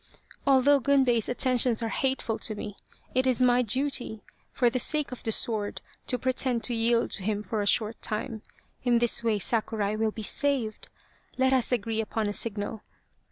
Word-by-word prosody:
" - - -24
Although 275 +1 +5
Gunbei's 255 -4 +2
attentions 245 -2 +2
are 225 - -2
hateful 260 -4 -1
to 215 - 0
me, 205 -1 -7 0.4
it 255 +1 +1
is 255 -3 +1
my 250 -1 +4
duty, 250 -2 -1 0.3
for 245 - +1
the 245 +2 0
sake 300 +2 +1
of 250 - -7
the 225 - -2
sword, 215 -2 +1 0.3
to 250 - +1
pretend 255 -1 0
to 245 - +1
yield 230 +1 +1
to - - 0
him 210 +1 -2
for 210 +2 -3
a 200 - -2
short 220 +1 +1
time. 220 +1 -4 0.4
In 245 -1 +3
this 235 0 +3
way 225 -2 +1
Sakurai 215 -1 0
will 220 0 0
be 220 0 -7
saved. 255 -2 -1 0.5
Let 260 0 +2
us 255 -2 +1
agree 225 -2 -1
upon 220 0 -3
a 205 - -2
signal. 210 0 -3
235 Hz, 185 wpm, -27 LUFS, 220-255 Hz, 0.5 s, Although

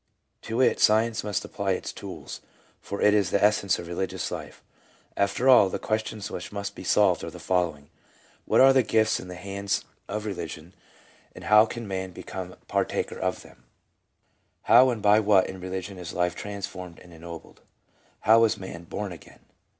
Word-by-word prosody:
To 115 +2 -4
it 130 - +3
science 110 +1 +3
must 105 -2 -2
apply 100 -1 -2
its - - -5
tools, - - -8 0.4
for 100 - -5
it 105 - +5
is 105 -2 +2
the 100 - +1
essence 105 -2 +3
of 85 - -7
re 85 - -6
ligious 95 +2 -3
life. - - -8 0.5
Aiter 100 +6 0
all, 120 -7 +7
the - - -3
questions 110 -1 -3
which 90 - -6
must 100 0 -5
be - - -10
solved - - +3
are - - -4
the - - -11
following: 85 -6 -1 0.5
What - - +4
are 135 0 +8
the 130 - +5
gifts 110 -2 +2
in - - -9
the 90 - -8
hands 100 +2 -3 0.2
of 105 +1 -4
Religion, 85 -3 -6 0.6
and - - -10
how 105 +1 +6
can 115 -1 -6
man 95 -1 -4
become 90 +1 -7
partaker - - -1
of - - -2
them - - -17
f - - -31 1.0
How 130 +2 +6
and 115 -5 -3
by 105 +1 +6
what 100 -3 +4
in 95 - -8
religion 95 +1 -5
is 90 -2 -7
life 90 0 0
transformed 95 -3 -7
and 90 - -16
ennobled? 85 0 -11 0.6
How 115 +1 +6
is 110 - 0
man 85 -3 -8
"born 100 +3 -5
again"? 85 - -14
100 Hz, 185 wpm, -26 LUFS, 90-105 Hz, 1.0 s, are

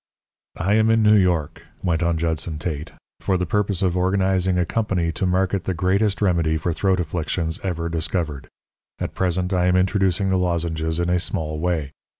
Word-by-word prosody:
"I 95 +5 +1
am 110 +1 +4
in 115 0 +4
New 105 0 +6
York," 85 -6 +2 0.2
went 85 -2 0
on 85 -1 +1
Judson 80 -1 -2
Tate, 75 -1 -4 0.3
"for 95 - 0
the 90 - -1
purpose 100 0 0
of 90 -2 +1
organizing 95 0 +1
a 90 - +2
company 95 -6 -1
to 95 - -2
market 95 +1 0
the 95 - -1
greatest 100 +4 +1
remedy 85 -4 +2
for 85 +2 -1
throat 95 +2 +1
affections 80 0 -2
ever 85 -3 -2
discovered. 80 -3 -3 0.5
At - - -4
present 90 0 0
I 90 -1 +2
am 90 - +3
introducing 95 0 +2
the 95 - +2
lozenges 80 -2 -1
in 85 0 0
a 90 - +2
small 80 -2 -3
way. 80 -5 -1
90 Hz, 180 wpm, -22 LUFS, 80-95 Hz, 0.5 s, New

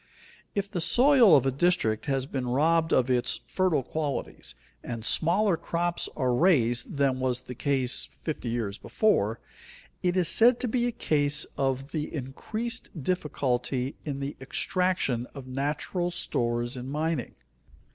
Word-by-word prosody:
_ - - -33 0.5
If 200 -1 0
the 175 - -2
soil 245 - +6
of 135 - +4
a 135 - +2
district 135 -7 +1
has 135 -2 0
been 135 -2 -3
robbed 160 +6 +2
of 130 -1 +3
its 125 -1 0
fertile 185 -7 +1
qualities 145 +1 -4 0.3
and 115 -1 -5
smaller 185 - +3
crops 175 +1 -2
are 130 -4 +1
raised 120 -7 +2
than 135 -2 +2
was 130 -1 0
the 125 - -8
case 130 0 -1
fifty 150 -6 -3
years 110 -4 -3
before, 115 - +1 0.6
it 180 0 +1
is 180 -3 +3
said 235 +8 +5
to 255 - 0
be 240 +1 +1
a - - -1
case 150 -6 +1
of 135 -1 0
of 140 - -15
the 155 -2 -3
increased 215 - -5
difficulty 135 -5 -1
in 140 -3 -4
the 140 +1 -4
extraction 135 -4 0
of 135 -2 -8
natural 145 +7 -2
stores 120 -7 -2
in 125 +1 -6
mining. 150 -2 -2
145 Hz, 155 wpm, -27 LUFS, 125-175 Hz, 0.6 s, soil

